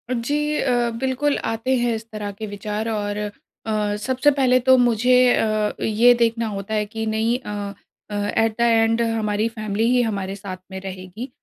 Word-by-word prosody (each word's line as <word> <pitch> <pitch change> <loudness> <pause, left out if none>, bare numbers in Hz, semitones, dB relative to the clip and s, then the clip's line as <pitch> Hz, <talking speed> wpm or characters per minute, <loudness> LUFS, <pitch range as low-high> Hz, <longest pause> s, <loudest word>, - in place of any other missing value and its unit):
जी 295 +5 -1
अ, 245 -2 +1
बिल्कुल 265 +2 0
आते 225 +4 0
हैं 240 -1 +1
इस 220 +1 -7
तरह 210 -1 -5
के 215 +2 -7
विचार 210 +2 -4
और 205 -2 -2 0.5
अ, 210 -1 0
सबसे 260 +5 +2
पहले 255 -2 +3
तो 260 +1 +5
मुझे 245 0 +3 0.2
अ, 215 -1 +1
ये 230 +3 +5
देखना 230 -1 +1
होता 200 +1 -5
है 210 -1 +1
कि 220 +1 -5
नहीं 220 +2 +1
अ 205 -4 -5 0.4
अ, 205 - -5
एट 205 +2 +1
द - - +1
एंड 225 0 +3
हमारी 220 -1 0
फैमिली 215 0 -2
ही 250 0 +4
हमारे 200 -4 -2
साथ 195 -2 -7
में 190 - -5
रहेगी। 190 +6 -7
225 Hz, 180 wpm, -22 LUFS, 210-245 Hz, 0.5 s, तो